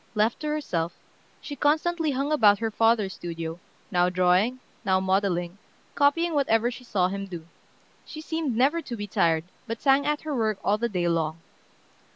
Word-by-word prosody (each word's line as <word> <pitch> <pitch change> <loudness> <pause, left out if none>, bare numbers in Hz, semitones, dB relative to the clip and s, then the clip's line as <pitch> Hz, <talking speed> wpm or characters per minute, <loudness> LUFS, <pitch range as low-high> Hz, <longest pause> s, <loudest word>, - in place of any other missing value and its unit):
Left 215 +2 +1
to 305 - -4
herself, 180 - -2 0.5
she 290 - -7
constantly 315 +3 +1
hung 275 +2 -1
about 210 -9 +5
her 225 +1 -2
father's 225 -3 +2
studio, 165 -2 -6 0.3
now 180 -1 +3
drawing, 185 +7 +2 0.2
now 190 -1 +2
modeling, 190 -1 0 0.3
copying 330 +4 +2
whatever 240 -5 +2
she 250 - -10
saw 190 -7 +1
him 195 +1 -5
do. 170 -4 -8 0.6
She 310 - -9
seemed 315 -6 -2
never 285 +7 +3
to 260 -6 -6
be 205 - -4
tired, 165 -5 +1 0.2
but 230 0 -4
sang 275 +1 +3
at 295 0 0
her 305 -2 -3
work 220 -4 0
all 210 +2 +1
the 235 +1 0
day 180 -4 -1
long. 165 -2 0
220 Hz, 175 wpm, -26 LUFS, 180-285 Hz, 0.6 s, about